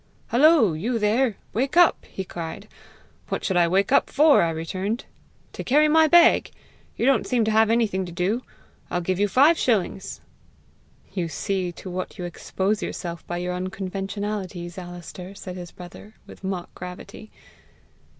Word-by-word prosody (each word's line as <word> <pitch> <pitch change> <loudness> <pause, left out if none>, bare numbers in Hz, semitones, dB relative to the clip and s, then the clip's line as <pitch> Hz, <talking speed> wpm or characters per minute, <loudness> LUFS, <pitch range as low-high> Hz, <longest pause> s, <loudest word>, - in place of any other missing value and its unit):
'Hullo, 255 - +5
you 225 +10 -1
there! 225 +2 +2 0.2
wake 265 +8 -1
up!' 350 -1 +5
he 190 - -5
cried. 170 -3 -7 0.6
'What - - -3
should 190 - -1
I 175 -1 +4
wake 195 +3 +1
up - - +4
for?' 295 +1 +5
I 170 - +2
returned. 185 +9 -3 0.5
'To - - -6
carry 300 +4 +4
my 320 +1 +5
bag. 345 +2 +5 0.5
You - - 0
don't 270 0 +3
seem 240 -3 +2
to 220 - +1
have 220 0 +4
anything 210 -5 +1
to - - -8
do! 190 +8 -1 0.5
I'll 175 - -1
give 185 +2 -1
you 205 - +3
five 285 - +4
shillings.'" 195 -5 -1 0.9
"You 180 -4 -2
see 185 +1 -2
to 185 - -9
what 185 +2 -5
you 180 - -5
expose 190 +4 -2
yourself 170 -2 -5
by 175 - -3
your 180 +1 -3
unconventionalities, 190 -1 -4
Alister!" 175 +1 -9
said 185 -2 -8
his 175 -2 -7
brother, 180 +5 -12
with - - -14
mock 190 -2 -4
gravity. 180 +4 -9
195 Hz, 160 wpm, -24 LUFS, 180-230 Hz, 0.9 s, Hullo